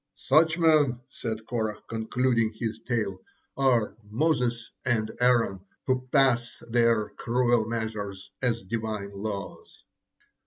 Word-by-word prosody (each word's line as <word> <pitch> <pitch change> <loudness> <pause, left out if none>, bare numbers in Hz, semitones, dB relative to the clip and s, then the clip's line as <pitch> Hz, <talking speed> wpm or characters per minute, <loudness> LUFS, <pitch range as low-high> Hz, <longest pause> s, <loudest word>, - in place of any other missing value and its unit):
Such 160 +4 +3
men," 155 -7 +4
said 110 -4 -5
Korah, 110 -3 -2
concluding 115 0 0
his 110 -1 -3
tale, 105 -6 -1 0.4
"are 125 -7 +2
Moses 120 -2 0
and 110 -3 0
Aaron, 120 -6 +3 0.3
who 130 -1 0
pass 120 -4 +3
their 115 -2 +2
cruel 120 -2 +1
measures 105 -4 -4
as 115 -3 0
Divine 105 0 -3
laws." 100 0 -6
115 Hz, 110 wpm, -27 LUFS, 110-125 Hz, 0.4 s, men